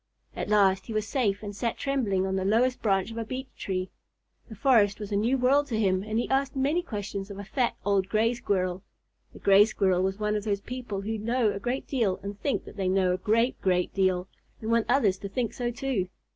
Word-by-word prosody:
At - - -4
last 195 -2 +3
he 225 - -5
was 215 0 -1
safe 215 -6 0
and 205 -1 -6
sat 230 +3 -2
trembling 225 -9 0
on 190 0 -1
the 190 - 0
lowest 235 +6 +2
branch 195 0 +1
of 230 - -5
a - - -1
beech 255 +4 -7
tree. 185 -1 -3 0.6
The 220 - -8
forest 215 -5 +3
was 210 -1 -6
a - - 0
new 230 +6 +2
world 275 +3 +3
to 225 -5 -2
him 190 -3 +2
and 215 +2 -3
he 240 - 0
asked 270 +1 0
many 285 +6 +1
questions 205 - -5
of 200 - -8
a 200 - -6
fat, 240 +4 -1
old 200 -1 +1
Gray 225 +2 +2
Squirrel. 185 -5 -1 0.5
The - - -13
Gray 200 +1 +6
Squirrel 190 -4 +1
was 190 +1 0
one 210 0 0
of 210 - -2
those 200 -2 -1
people 245 -4 -5
who 220 +2 -3
know 230 0 +1
a - - -5
great 245 +5 -2
deal 225 -9 0
and 200 +1 -7
think 280 - -1
that - - -12
they 190 -2 -1
know 185 -1 +2
a - - -1
great, 230 +6 +1
great 180 -1 +1
deal, 185 -2 +1 0.3
and 220 +1 -3
want 230 -1 +2
others 215 -8 +3
to 200 - -6
think 235 +3 -2
so 245 -1 -2
too. 240 -7 -2
210 Hz, 235 wpm, -27 LUFS, 195-240 Hz, 0.6 s, Gray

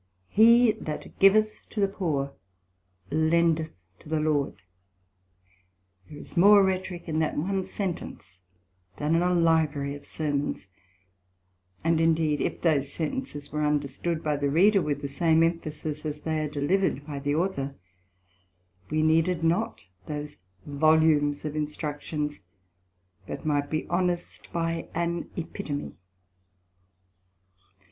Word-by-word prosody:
He 235 +2 +6
that 150 -1 -7
giveth 215 +2 +5
to 215 - -5
the 200 - +4
poor, 150 -8 -2 0.8
lendeth 160 +1 +2 0.2
to - - -14
the 160 0 +1
Lord; 150 -8 0 1.5
there 150 - -10
is - - -12
more 200 +3 +7
Rhetorick 185 -2 -2
in 160 -1 -1
that 160 - 0
one 190 +5 0
sentence, 175 - -5 0.6
than 150 +2 0
in 165 - +3
a 180 0 +2
Library 160 -5 +2
of 145 - -11
Sermons; 145 -8 -2 1.2
and 165 0 +2
indeed 160 -2 +2
if - - -2
those 145 -5 +1
Sentences 155 - -4
were 150 +1 -1
understood 150 +3 -1
by 150 -1 0
the 140 0 0
Reader, 195 +7 +5
with 145 -2 -2
the - - -1
same 160 +3 +3
Emphasis 155 -2 -2
as 150 -1 -4
they 160 -1 -1
are 150 - -2
delivered 145 +1 0
by 145 -2 -5
the 145 +1 -1
Author, 150 -6 -1 1.1
we 155 0 +1
needed 165 +2 +2
not 165 - 0 0.2
those 150 -4 -6 0.3
Volumes 150 0 +3
of 150 0 -3
instructions, 150 -2 -3 0.9
but - - -6
might 145 -2 0
be 155 0 -2
honest 175 0 -2
by 165 -1 -2
an 170 0 -2
Epitome. 150 -3 -4
155 Hz, 125 wpm, -27 LUFS, 145-170 Hz, 1.5 s, more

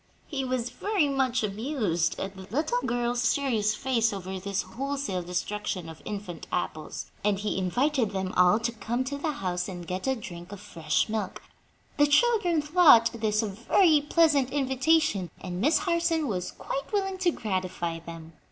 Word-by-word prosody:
He 275 -4 -3
was 255 -2 -2
very 405 -7 +1
much 265 -4 +1
amused 210 - -1
at 195 0 -4
the 190 -1 -10
little 245 +1 0
girl's 240 0 0
serious 225 -4 +1
face 230 -3 +1
over 190 -1 -5
this 195 0 -2
wholesale 275 -7 -3
destruction 180 +1 -3
of 160 -1 -10
infant 200 -5 -6
apples, 155 -3 -4
and 205 -1 +2
he 210 +2 -2
invited 245 - +1
them 190 -2 -3
all 180 +4 +5
to 235 - 0
come 235 +3 -2
to 280 +2 -4
the 310 +1 -1
house 180 -7 -2
and 175 -2 -7
get 185 +7 -4
a 265 - +2
drink 175 -5 -9
of 205 - -8
fresh 155 -4 -1
milk. 220 -1 -4 0.6
The 290 - +6
children 350 -1 +3
thought 295 -8 +6
this 215 -1 0
a - - -1
very 295 - +3
pleasant 295 -3 +3
invitation, 265 - +1
and 180 0 -5
Miss 300 +6 +4
Harson 340 -4 +1
was 185 -6 -2
quite 275 - -5
willing 385 -2 -1
to 365 -1 +3
gratify 185 - -3
them. 165 -1 -10
230 Hz, 170 wpm, -27 LUFS, 185-285 Hz, 0.6 s, The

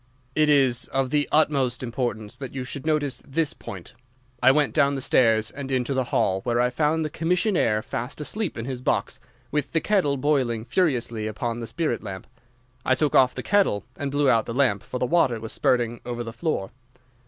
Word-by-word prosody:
"It 155 +1 +3
is 130 -4 +3
of 135 -1 -1
the 145 -1 +1
utmost 135 -5 +2
importance 115 -3 -3
that 135 0 -8
you 130 - -3
should 140 +3 -6
notice 145 -5 0
this 150 +2 -1
point. 95 +4 -9 0.5
I 130 - +6
went 145 +2 +3
down 140 0 +3
the - - -2
stairs 115 -4 +3
and 140 -1 -7
into 130 0 0
the 130 -1 0
hall, 95 -5 +1
where 120 +1 0
I 125 0 +2
found 155 +4 +1
the - - -2
commissionnaire 170 - +1
fast 120 +6 -5
asleep 190 - -3
in 115 - -4
his 130 -1 -5
box, - - -1 0.3
with 145 -1 -2
the 165 - +3
kettle 160 -7 +1
boiling 130 -5 0
furiously 120 -7 0
upon 115 +2 -3
the 115 - -5
spirit 155 -6 -2
lamp. 95 -3 -7 0.6
I 130 - +3
took 150 0 0
off 130 -1 +5
the - - -5
kettle 195 - +2
and 140 -2 -3
blew 145 0 +1
out 115 -4 +3
the 115 - -4
lamp, 125 -8 +2
for - - -6
the 125 - +1
water 125 -5 +2
was 110 0 -6
spurting 120 -1 +1
over 120 -1 -4
the 115 -1 -7
floor. 120 - -2
130 Hz, 200 wpm, -24 LUFS, 120-150 Hz, 0.6 s, I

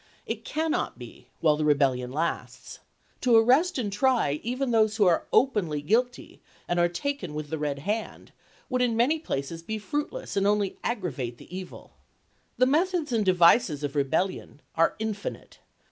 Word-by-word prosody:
It - - -4
cannot 315 - -2
be 120 0 -12
while 155 -2 +4
the 155 - -1
Rebellion 135 -4 +2
lasts. 160 +5 -4 0.4
To 245 -3 +4
arrest 260 +11 +4
and 210 -6 -2
try 230 - +2
even 255 +2 -2
those 220 -2 +2
who 210 - +4
are 175 -2 +2
openly 200 - +2
guilty, 240 +8 -1 0.3
and 175 - 0
are 175 0 +3
taken 180 - -4
with 150 -1 -5
the 160 - -2
red 145 -2 -2
hand, 210 +9 -4 0.4
would 255 -1 -1
in 235 -2 +1
many 280 +7 +2
places 165 - -4
be 220 +6 -4
fruitless, 295 - -4
and 200 0 +2
only 205 -2 0
aggravate 140 - -3
the 180 - -11
evil. 185 -1 -9 0.7
The 255 - +5
meth 335 +8 +2
ods 315 -5 -2
and 220 -2 +2
devices 175 - +4
of 145 0 -3
rebellion 150 +2 -1
are 165 0 +2
infinite. 215 -2 -5
200 Hz, 165 wpm, -27 LUFS, 150-245 Hz, 0.7 s, The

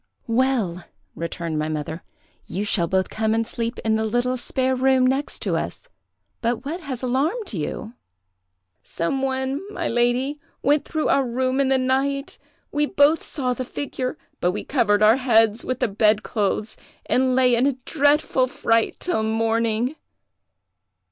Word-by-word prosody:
"'Well,' 230 -8 0 0.3
returned 165 -1 -4
my 155 +1 -1
mother, 155 +2 -4 0.5
'you 200 +3 -3
shall 175 -4 +2
both 190 0 0
come 220 0 0
and 225 0 +1
sleep 230 +1 -3
in 220 0 +3
the 220 - 0
little 245 +3 0
spare 260 +1 0
room 260 0 +3
next 270 +3 0
us; - - -3 0.5
but 235 0 -1
what 320 +5 -3
has 270 -7 -6
alarmed 295 - 0
you?' 200 +6 -4 0.9
"'Some 265 +11 -2
one, 265 +2 -1
my 345 -5 -3
lady, 245 +5 +1 0.2
went 290 +2 +3
through 315 -2 -1
our 275 - +4
room 255 +2 0
in 275 -1 +2
the 270 - +4
night; 270 +2 -1 0.3
we 295 0 +1
both 295 +3 +4
saw 255 -4 -2
the 255 - -4
figure, 255 +1 -4 0.2
but 180 +1 +1
we - - -4
covered 215 -6 +2
our 220 +3 +6
heads 225 -4 +3
with 255 0 -3
the - - +3
bed 210 0 +2
clothes, 210 0 -2 0.3
and 255 0 +2
lay 255 -1 +4
in 240 +3 +3
a 280 - +2
dreadful 290 -3 +2
fright 230 -2 +1
till 355 -11 -1
morning. 225 +3 0
250 Hz, 155 wpm, -23 LUFS, 220-270 Hz, 0.9 s, our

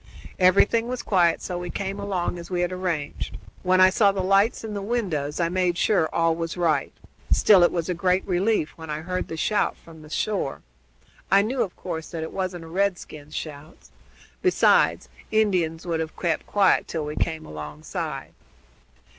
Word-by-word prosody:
Everything 200 +5 +4
was 250 0 -4
quiet, 175 -4 +2
so 180 -1 -3
we 175 0 -5
came 195 +2 -4
along 185 -3 -2
as 170 - -9
we 180 -1 -1
had 175 0 0
arranged. 180 -5 -3 0.2
When 185 0 +3
I 185 0 +7
saw 200 0 +4
the 195 -1 -2
lights 195 +5 +3
in 220 -1 -5
the 200 - -3
windows 180 -10 -2
I 170 - +2
made 180 0 0
sure 185 -6 +2
all 165 -1 +2
was 165 +1 -4
right: 160 -5 +1 0.4
still 200 -4 +6
it 175 - +5
was 170 -2 -2
a 180 - 0
great 180 +2 +1
relief 185 -2 +1
when 160 -1 -9
I 150 0 -3
heard 180 +2 -3
the 165 - -6
shout 210 +6 +1
from 160 -1 -15
the 155 - -13
shore. 190 -4 -2 0.7
I 195 +2 +5
knew, 250 +4 -1
of 185 - -2
course, 165 -3 -6
that 165 -2 -4
it 160 - -6
wasn't 185 -3 -3
a - - -10
redskin's 165 -5 -3
shout. 150 0 -8 0.5
Besides, 370 - +3 0.2
Indians 180 -7 +1
would 165 -2 -1
have 160 -1 -4
kept 170 -2 -1
quiet 200 -2 +3
till 160 -3 -3
we 150 +1 -5
came 160 -1 -2
alongside." 75 0 -6
175 Hz, 185 wpm, -24 LUFS, 160-195 Hz, 0.7 s, I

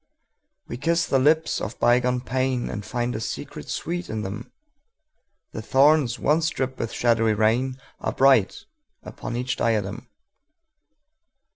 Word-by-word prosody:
We 120 - -6
kiss 165 +5 +1
the 135 - +2
lips 155 +4 +2
of 110 - -5
bygone 125 +1 +2
painAnd 125 -4 -2
find 120 0 -2
a - - -3
secret 110 - -6
sweet 175 +2 -4
in 110 -1 -3
them:The 285 - -12
thorns 135 -2 +3
once 160 +2 +2
dripped 130 -2 -4
with 115 - -3
shadowy 115 -2 +2
rainAre 125 +5 -1
bright 130 -7 +3 0.4
upon 120 - -7
each 125 +1 -2
diadem. 110 0 -1
125 Hz, 120 wpm, -24 LUFS, 115-145 Hz, 0.4 s, thorns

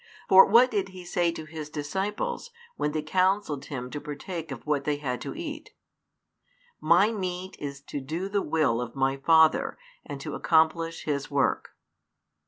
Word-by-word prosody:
For 190 0 +8
what 240 +5 +6
did 200 -3 -1
He 185 -1 -11
say 175 -1 +1
to 160 - -7
His 155 -1 -7
disciples, 195 - -3 0.3
when 150 - -1
they 155 0 -2
counselled 185 -4 +1
Him 125 -4 -6
to 145 - -5
partake 160 +2 -6
of 130 - -7
what 150 -2 0
they 150 +1 0
had 130 -4 -4
to - - -6
eat? 310 -2 -7 1.0
My 175 +7 +4
meat 185 -3 -4
is 140 -1 -6
to 145 0 -6
do 165 +8 -4
the 200 0 0
will 145 -8 +1
of 120 +1 -6
My 135 0 +1
Father, 160 +3 +4 0.3
and - - -7
to - - -6
accomplish 165 0 +1
His 140 -2 -2
work. 140 -1 0
160 Hz, 170 wpm, -27 LUFS, 145-190 Hz, 1.0 s, For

